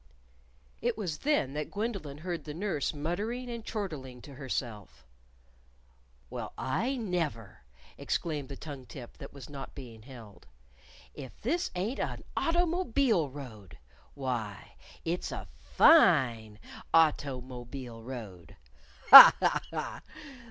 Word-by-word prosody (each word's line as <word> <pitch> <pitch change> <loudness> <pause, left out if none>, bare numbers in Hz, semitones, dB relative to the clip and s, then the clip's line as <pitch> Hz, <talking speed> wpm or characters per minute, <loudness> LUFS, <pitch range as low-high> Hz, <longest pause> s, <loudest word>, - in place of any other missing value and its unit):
It 240 0 -1
was 175 -8 -4
then 290 - 0
that 150 0 -4
Gwendolyn 195 -9 -4
heard 170 +2 -5
the 150 -1 -7
nurse 175 -6 -2
muttering 210 +12 -4
and 235 -1 -6
chortling 155 - -6
to 140 - -11
herself. 110 - -6 1.3
"Well, - - -6
I 230 - -1
never!" 165 - -4 0.4
exclaimed 150 -5 -3
the 140 - -7
tongue 140 -5 -9
tip 125 -5 -11
that - - -9
was 140 -4 -11
not 140 -2 -9
being 120 -5 -11
held. 110 -7 -14 0.7
"If 130 - -11
this 335 +10 -1
ain't 205 +9 -3
a' - - -3 0.2
automobile 320 - +1
road! 115 - -11 0.4
Why, 120 -7 -5 0.3
it's 170 +2 -3
a - - -7
fine 125 - +4 0.3
auto_mo_bile 130 -6 -1
road! 105 -10 -9 0.6
Ha! - - +14
ha! - - +1
ha! - - -5
145 Hz, 115 wpm, -29 LUFS, 125-195 Hz, 1.3 s, Ha